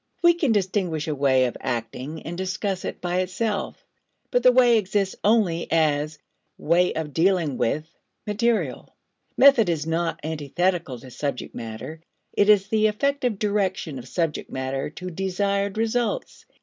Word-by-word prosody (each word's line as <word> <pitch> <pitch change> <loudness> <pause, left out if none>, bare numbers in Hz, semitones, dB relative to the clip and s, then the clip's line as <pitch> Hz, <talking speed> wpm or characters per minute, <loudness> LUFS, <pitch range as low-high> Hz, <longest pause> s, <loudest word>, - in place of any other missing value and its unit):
We 345 0 +7
can 330 -7 0
distinguish 185 -6 0
a 155 - 0
way 135 -2 +3
of 125 - -3
acting, 130 +5 -4
and 170 - -5
discuss 190 +1 -3
it - - -5
by 180 0 -1
itself; 200 +3 -2 0.5
but 245 - +3
the 250 +1 +7
way 245 -2 +5
exists 195 -1 -1
only 200 -6 +2
as 155 -1 +1 0.4
way 175 +3 +2
of 155 -2 -4
dealing 170 -5 +2
with 155 +7 0 0.4
material. 225 +2 -1 0.4
Method 260 -8 +6
is 155 -3 -1
not 165 +1 -1
antithetical 160 0 -1
to 130 -1 -12
subject 140 0 -4
matter; 115 +8 -7 0.3
it 205 - +3
is 205 -2 +5
the 215 -1 +3
effective 250 +1 0
direction 190 -8 -1
of 125 - -10
subject 165 +1 -2
matter 130 +2 -3
to 180 +4 -7
desired 200 +2 -1
results. 240 - -2
180 Hz, 150 wpm, -24 LUFS, 155-210 Hz, 0.5 s, We